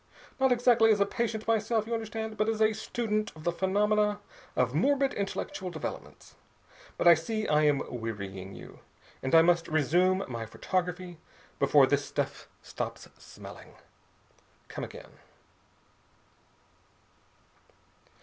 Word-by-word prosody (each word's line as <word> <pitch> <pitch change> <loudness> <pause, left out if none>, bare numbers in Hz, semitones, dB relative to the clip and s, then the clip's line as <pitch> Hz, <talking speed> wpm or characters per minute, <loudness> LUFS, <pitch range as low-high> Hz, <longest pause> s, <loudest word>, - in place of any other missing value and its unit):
Not 265 -1 +3
exactly 240 -2 +4
as 210 - +3
a 200 - +4
patient 220 0 -3
myself, 220 0 +1
you 235 - -4
understand, 220 -1 -4
but 215 +1 +1
as 220 -1 -1
a 220 0 +4
student 215 -1 -2
of 155 - -12
the 175 - +1
phenomena 205 +3 +1 0.4
of 125 -1 +1
morbid 275 - +2
intellectual 200 +1 -4
developments. 160 -4 -7 0.6
But - - +2
I 170 - +11
see 215 +7 -2
I 150 0 +3
am 145 -2 +2
wearying 100 -5 -6
you, - - -12 0.4
and 130 +4 +1
I 165 - +8
must 170 0 +3
resume 180 +5 +2
my 115 -3 -5
photography 180 - -3 0.4
before - - +5
this - - +1
stuff - - -4 0.2
stops - - -6
smelling. - - -12 0.9
Come - - -6
again." - - -10
195 Hz, 130 wpm, -29 LUFS, 160-220 Hz, 0.9 s, I